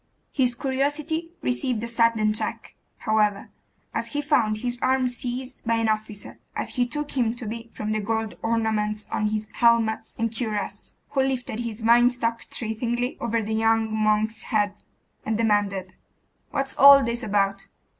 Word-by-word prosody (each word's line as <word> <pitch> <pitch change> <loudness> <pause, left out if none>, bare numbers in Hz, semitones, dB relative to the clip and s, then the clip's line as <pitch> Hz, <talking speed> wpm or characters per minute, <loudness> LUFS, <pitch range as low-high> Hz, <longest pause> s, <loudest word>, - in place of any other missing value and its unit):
His 250 -3 +2
curiosity 290 +5 -1
received 250 -2 0
a - - -2
sudden 230 -2 +2
check, 215 - -3 0.2
however, 210 -2 +1 0.4
as - - -1
he 290 - -2
found 230 -8 +2
his 245 +2 -3
arm 260 0 +2
seized 250 +1 -5
by 230 -1 +1
an 225 -1 +1
officer, 215 -1 -3 0.2
as - - -2
he 245 -2 0
took 295 +3 -3
him 240 -3 +1
to 240 - -6
be, 230 +2 -6
from 215 0 -4
the 215 0 0
gold 220 +1 -2
ornaments 215 -2 0
on 215 - 0
his 215 0 -2
helmet 230 -2 +2
and 230 0 -1
cuirass, 215 -4 -4 0.2
who 270 - +2
lifted 255 -4 -2
his 230 -1 -4
vine 240 +2 +6
stock 230 -2 -2
threateningly 240 +2 -2
over 230 -1 0
the 220 +1 -3
young 225 0 +2
monk's 215 +1 +1
head, 205 -2 -1 0.4
and 220 -1 -1
demanded 205 -4 0 0.6
'What's 275 -2 -1
all 280 0 +10
this 235 0 -1
about? 195 -3 0
230 Hz, 160 wpm, -25 LUFS, 215-245 Hz, 0.6 s, all